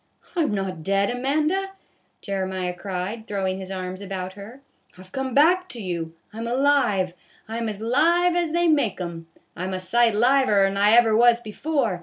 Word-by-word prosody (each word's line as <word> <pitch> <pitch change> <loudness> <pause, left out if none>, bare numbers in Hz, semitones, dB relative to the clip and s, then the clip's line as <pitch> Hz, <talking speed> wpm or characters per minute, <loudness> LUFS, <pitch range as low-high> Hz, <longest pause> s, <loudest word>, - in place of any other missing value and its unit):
" - - -29
I 345 - +2
'm 300 - +1
not 190 -4 -3
dead, 195 +5 +1
Amanda," 305 +10 0 0.5
Jeremiah 190 -2 -3
cried, 195 +4 -5
throw 200 -2 -2
ing 190 0 -2
his 190 -1 -7
arms 185 0 -5
about 190 -2 -5
her, 210 +7 -11 0.2
" - - -30
I 185 - -12
've 185 - -20
come 265 +2 -3
back 355 +5 +4
to 245 - -7
you. 170 -5 -4 0.2
I 220 - -8
'm 230 - -4
alive, 240 -8 +2 0.3
I 225 +1 -5
'm 230 -1 -2
as 210 -1 -6
live 335 +9 +3
as 345 -2 0
they 345 +1 +2
make 285 - +2
'um, 170 -2 -6 0.3
I 180 - -5
'm 190 0 -3
a - - -3
sight 230 +4 +2
liver 240 -4 +4
'n 195 0 -1
I 205 +2 +4
ever 230 -2 +5
was 235 +1 +5
before. 240 - -2
215 Hz, 210 wpm, -24 LUFS, 190-270 Hz, 0.5 s, ever